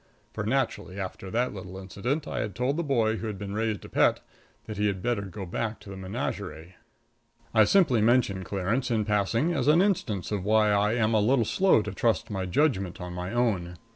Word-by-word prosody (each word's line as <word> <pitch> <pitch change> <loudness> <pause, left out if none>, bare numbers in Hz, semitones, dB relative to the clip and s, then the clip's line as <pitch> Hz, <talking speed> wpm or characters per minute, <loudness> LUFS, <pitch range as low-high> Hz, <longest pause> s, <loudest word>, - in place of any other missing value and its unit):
For, 105 - -3
naturally, 105 -6 -1
after 95 0 -6
that 120 +4 0
little 95 -1 -8
incident, 120 +11 -3
I - - -3
had 105 - -3
told 125 +3 0
the 170 - 0
boy 115 -7 +1
who 110 - -4
had 105 -2 -4
been 100 0 -6
raised 110 -2 -2
a - - -8
pet - - +3 0.5
that 110 -2 -7
he 105 +1 +2
had 95 -2 -2
better 120 -4 0
go 100 0 -7
back 110 +5 -3
to 105 -2 -10
the - - -7
menagerie. 90 -2 -5 0.8
I 110 -2 +6
simply 130 - +4
mention 110 -5 +2
Clarence 100 +8 -1
in 110 -3 +1
passing 110 - +1
as 160 - -1
an 155 +3 +6
instance 150 - 0
of 100 -3 -1
why 105 +1 +3
I 105 +1 +2
am 115 -2 +1
a 110 - +4
little 120 +2 +3
slow 190 - +3
to 105 - -4
trust 110 +3 0
my 95 -2 -2
judgment 95 - +1
on 90 -1 -6
my 90 +2 -4
own. 100 -8 0
105 Hz, 210 wpm, -27 LUFS, 95-120 Hz, 0.8 s, I